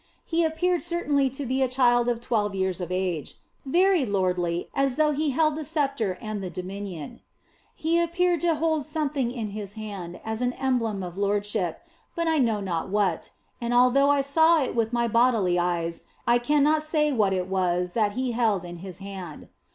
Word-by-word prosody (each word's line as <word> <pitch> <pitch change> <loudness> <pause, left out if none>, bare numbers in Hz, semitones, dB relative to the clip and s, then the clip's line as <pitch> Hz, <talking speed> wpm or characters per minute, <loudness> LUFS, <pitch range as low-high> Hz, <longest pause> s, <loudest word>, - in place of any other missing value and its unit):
He 335 0 +1
appeared 340 +2 +1
certainly 295 -6 +1
to 270 +2 -6
be 260 +2 -1
a 260 - +3
child 245 -2 +3
of 235 -1 -1
twelve 210 -4 -1
years 190 -1 -1
of 175 0 -5
age, 180 -4 -2 0.3
very 360 +2 +3
lordly, 180 -5 0
as 275 -2 +1
though 305 -1 +3
He 300 +1 0
held 310 +2 +2
the 310 - -4
sceptre 275 - -1
and 215 -2 -5
the 185 - -4
dominion. 185 -3 -6 0.6
He 335 +2 +1
appeared 345 0 +1
to 340 -2 +2
hold 315 -1 0
something 295 -4 -1
in 230 -4 -4
His 205 -1 -6
hand 200 -5 -7
as 220 +1 -3
an 250 0 0
emblem 230 -7 -1
of 180 +1 -7
lordship, 205 - -1 0.3
but 335 0 -1
I 320 -1 +2
know 225 -5 +1
not 180 -2 -3
what, 195 -4 0 0.3
and 240 +1 -1
although 255 +3 +5
I 285 -1 +4
saw 320 +3 +4
it 255 - -3
with 225 -1 +1
my 235 -1 +1
bodily 225 -6 +3
eyes 170 -1 -2 0.2
I 240 0 +4
cannot 295 +4 +3
say 305 -1 +1
what 210 -5 +2
it 185 -1 -1
was 180 -2 0
that 210 -3 +1
He 255 +1 -1
held 220 -6 +1
in 175 0 -8
His 185 +1 -9
hand. 185 -6 -8
235 Hz, 190 wpm, -26 LUFS, 190-290 Hz, 0.6 s, although